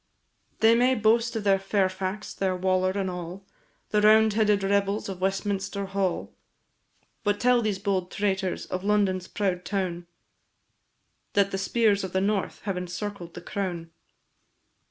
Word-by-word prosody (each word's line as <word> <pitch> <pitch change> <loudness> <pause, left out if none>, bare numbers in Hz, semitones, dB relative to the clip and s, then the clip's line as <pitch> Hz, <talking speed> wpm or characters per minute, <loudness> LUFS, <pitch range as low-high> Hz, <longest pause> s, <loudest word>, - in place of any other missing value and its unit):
They 225 +1 +6
may 250 +2 +3
boast 230 +1 +2
of 220 - -2
their 195 -1 +3
Fairfax, 195 +1 -1
their 190 -1 -1
Waller, 185 0 +1
and 195 0 -2
all 180 +1 -6 0.5
The 210 - +3
roundheaded 215 -1 +4
rebels 200 +1 +1
of 185 -1 -6
Westminster 195 +1 -1
Hall; 195 -2 -2 0.9
But 205 -1 +1
tell 250 -1 +4
these 215 -3 -1
bold 190 -2 -1
traitors 190 -3 -1
of 185 0 -4
London's 200 -3 +1
proud 185 -3 -2
town, 180 -4 -3 1.3
That 200 -1 +3
the 195 - -2
spears 205 0 +2
of 190 - -5
the 190 - +2
north 200 0 -1
have 195 -3 -2
encircled 180 0 -5
the 175 - -7
crown. 175 -3 -4
195 Hz, 140 wpm, -26 LUFS, 185-210 Hz, 1.3 s, They